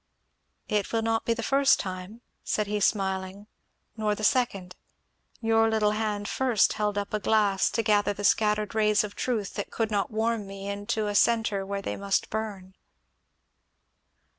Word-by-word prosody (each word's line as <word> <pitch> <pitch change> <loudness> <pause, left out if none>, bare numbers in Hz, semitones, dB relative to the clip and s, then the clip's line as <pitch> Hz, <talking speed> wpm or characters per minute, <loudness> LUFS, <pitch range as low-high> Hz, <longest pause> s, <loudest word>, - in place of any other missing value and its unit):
"It 210 -2 -1
will 225 -1 0
not 225 0 0
be 230 - +1
the 230 - -4
first 275 +2 +4
time," 185 +4 -6 0.2
said 210 - 0
he 210 +1 -2
smiling, 190 -1 -1 0.5
"nor 215 -2 0
the 215 - -7
second. 200 -6 0 0.7
Your 225 0 +3
little 215 -1 +2
hand 210 -1 -2
first 250 -6 +2
held 210 -1 -1
up 205 0 -3
a 215 - +1
glass 205 -2 +2
to 230 - -1
gather 205 -1 +2
the 205 0 -6
scattered 210 0 +2
rays 215 -1 +3
of 205 -1 -6
truth 220 -6 -2
that 205 0 -4
could 225 -1 -2
not 200 -2 0
warm 220 -2 -1
me 195 0 -8
into 205 +2 -2
a 205 - -2
centre 220 -2 +2
where 200 0 -3
they - - -3
must 200 0 -1
burn." 205 -4 -5
210 Hz, 165 wpm, -27 LUFS, 200-220 Hz, 0.7 s, first